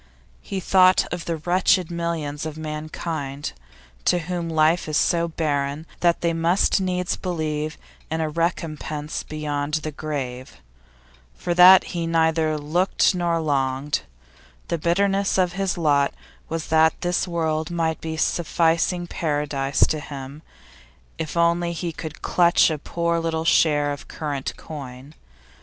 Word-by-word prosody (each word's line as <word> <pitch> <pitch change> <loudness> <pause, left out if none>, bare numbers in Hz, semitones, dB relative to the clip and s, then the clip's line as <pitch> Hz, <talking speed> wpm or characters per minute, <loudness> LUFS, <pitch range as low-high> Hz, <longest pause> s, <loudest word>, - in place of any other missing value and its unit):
He 195 - -4
thought 185 0 +5
of 175 -1 -5
the 165 -1 -2
wretched 180 +1 +2
millions 165 -4 -3
of 155 0 -7
mankind 155 -2 -5 0.5
to - - +4
whom 175 0 -3
life 160 +1 +2
is 155 - +1
so 170 -1 +2
barren 145 -2 -2
that 170 -1 +2
they 170 -1 +1
must 170 +4 +2
needs 180 -1 -1
believe 155 -4 -3 0.3
in 160 0 -2
a 160 - 0
recompense 155 -2 -3
beyond 150 -1 -3
the 155 -1 -3
grave. 130 - -5 0.8
For 175 - -2
that 180 +2 +9
he 170 -1 -2
neither 160 -1 +2
looked 170 +8 +2
nor 170 -2 0
longed. 140 -1 0 0.7
The 170 - -1
bitterness 195 +4 +1
of 180 -2 +2
his 195 -1 -1
lot 145 -4 +2 0.3
was 165 -1 -4
that 160 0 +4
this 175 +1 0
world 160 -2 -1
might 165 -2 -1
be 160 0 -4
a - - -8
sufficing 170 +2 +1
paradise 145 -4 0
to 155 - -2
him 140 0 -8 0.8
if 160 +1 -4
only 170 0 +2
he 170 0 -3
could 160 0 -8
clutch 175 -1 +4
a 155 - -3
poor 170 +2 -1
little 165 -1 -2
share 145 -3 +3
of 145 - -7
current 145 -4 -4
coin. 135 -2 -9
160 Hz, 140 wpm, -23 LUFS, 150-170 Hz, 0.8 s, that